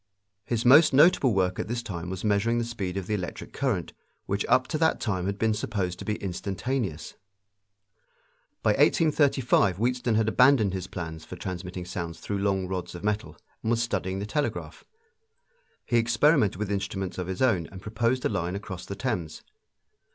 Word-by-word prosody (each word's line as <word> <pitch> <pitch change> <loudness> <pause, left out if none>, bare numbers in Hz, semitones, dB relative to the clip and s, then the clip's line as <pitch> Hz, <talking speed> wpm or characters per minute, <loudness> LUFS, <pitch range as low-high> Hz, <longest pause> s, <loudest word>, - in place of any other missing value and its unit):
His 120 -1 -1
most 145 +5 +7
notable 145 -2 +5
work 95 -3 +1
at - - -2
this 120 +1 -3
time 90 -4 -5
was 95 0 -5
measuring 105 +2 +2
the 120 - +1
speed 100 -6 -4
of 95 - -3
the 105 - -2
electric 90 -4 -5
current, 115 -11 -1 0.3
which 100 +1 -1
up 130 0 +4
to 155 - -1
that 160 0 +2
time 95 -5 -1
had 100 0 -2
been 110 +1 +2
supposed 100 -4 -3
to - - -7
be 105 - -1
instantaneous. 100 - -3 1.5
By - - +4
1835 140 - +3
Wheatstone 120 +1 0
had 110 0 +2
abandoned 120 -4 +4
his 95 -1 -4
plans 80 -3 -6
for - - -9
transmitting 90 -1 -6
sounds 85 -2 -5
through 100 -1 -3
long 95 -2 0
rods 90 -1 -4
of 85 - -8
metal 105 +2 -2 0.2
and 110 - -2
was 115 0 +2
studying 95 -5 -2
the 100 - -3
telegraph. 145 +7 -3 1.0
He 120 - +2
experimented 115 - +3
with 105 +1 -3
instruments 95 -2 -3
of 90 - -3
his 95 +5 -2
own 95 -11 +2
and 95 - -9
proposed 115 +5 -1
a - - +3
line 90 -3 -2
across 100 -3 -7
the 100 - -5
Thames. 100 -10 -3
105 Hz, 180 wpm, -27 LUFS, 95-120 Hz, 1.5 s, most